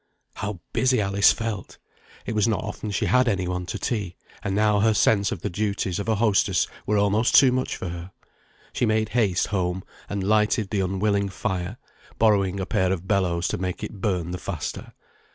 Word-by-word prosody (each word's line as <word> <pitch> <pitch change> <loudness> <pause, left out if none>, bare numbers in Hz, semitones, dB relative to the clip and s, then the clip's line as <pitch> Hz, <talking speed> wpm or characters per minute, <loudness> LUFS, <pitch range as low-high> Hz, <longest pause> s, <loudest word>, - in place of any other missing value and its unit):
How 100 -2 -5
busy 130 -2 +2
Alice 100 0 +4
felt! 110 -3 -4 0.5
it - - -3
was 105 0 +2
not 110 -3 0
often 105 +1 -5
she 100 - -1
had 125 0 +3
any 95 -5 0
one 90 0 -3
to - - -3
tea; 100 -7 -3 0.3
and 100 - -1
now 105 0 +3
her 110 +1 +3
sense 100 -1 +3
of 85 - -4
the 105 - -1
duties 100 -1 -1
of 100 - -3
a 110 - +3
hostess 100 -4 +2 0.2
were 105 - +2
almost 105 +3 +2
too 130 -2 +7
much 130 +1 -1
for 90 - -5
her. 85 +2 -7 0.6
She 120 - +1
made 110 0 +1
haste 105 -6 +1
home, 95 -2 -1 0.3
and 100 -1 -2
lighted 105 +1 +2
the 105 - 0
unwilling 100 +1 0
fire, 95 +2 -3 0.4
borrowing 100 -3 +2
a 95 - -2
pair 95 0 +1
of 95 -1 -3
bellows 90 -4 +1
to - - -2
make 90 -1 -3
it 100 - -7
burn 90 -5 -1
the 90 - -4
faster. 90 -6 -5
100 Hz, 195 wpm, -24 LUFS, 95-110 Hz, 0.6 s, too